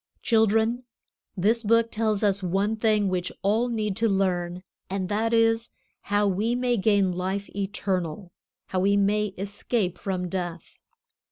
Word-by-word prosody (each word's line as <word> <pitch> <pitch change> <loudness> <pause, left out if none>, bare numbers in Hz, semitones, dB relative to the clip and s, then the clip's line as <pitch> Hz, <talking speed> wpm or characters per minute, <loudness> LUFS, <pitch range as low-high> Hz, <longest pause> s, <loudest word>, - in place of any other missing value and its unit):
Children, 225 +2 +2 0.5
this 220 +6 +2
Book 230 +1 +2
tells 215 -1 0
us 200 -1 +2
one 195 +4 0
thing 215 -2 +2
which 185 -1 -1
all 220 +5 +2
need 215 -4 -2
to 225 0 +2
learn, 180 -2 0 0.3
and 190 -1 -2
that 220 +2 0
is, 225 0 +3 0.4
how 205 0 +2
we 210 +5 0
may 245 -1 +1
gain 200 -2 +2
life 190 +3 -3
eternal, 190 -3 -3 0.4
how 185 - -1
we 200 +2 +3
may 210 +1 +2
escape 200 0 -2
from 185 -2 -2
death. 175 -2 -5
205 Hz, 145 wpm, -26 LUFS, 185-225 Hz, 0.5 s, is